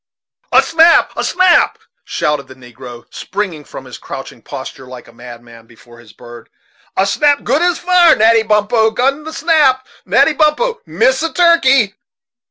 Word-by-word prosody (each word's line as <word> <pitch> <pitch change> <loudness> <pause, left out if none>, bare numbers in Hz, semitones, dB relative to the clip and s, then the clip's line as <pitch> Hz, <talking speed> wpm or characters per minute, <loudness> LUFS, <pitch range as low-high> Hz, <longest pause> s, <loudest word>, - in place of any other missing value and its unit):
"A - - +4
snap, 330 +1 +3
a - - -3
snap!" 370 -1 +2 0.3
shouted 150 -2 -3
the 130 - -14
negro, 125 -1 -13
springing 185 -6 -5
from 135 - -12
his 125 - -11
crouching 135 -3 -10
posture 130 -1 -10
like 125 -1 -12
a - - -18
madman, 120 -1 -14
before 120 +1 -19
his 115 -3 -17
bird. 120 -1 -15 0.5
"A 190 - +2
snap 285 +9 0
good 295 - 0
as 350 -1 +1
fire 355 -2 +3
Natty 225 +1 +3
Bumppo 220 +1 +1
gun 270 +6 -2
he 315 - -8
snap 305 -5 +1 0.2
Natty 320 - +2
Bumppo 455 +11 0
miss - - 0
a 330 0 -3
turkey!" 275 - +2
220 Hz, 160 wpm, -14 LUFS, -, 0.5 s, A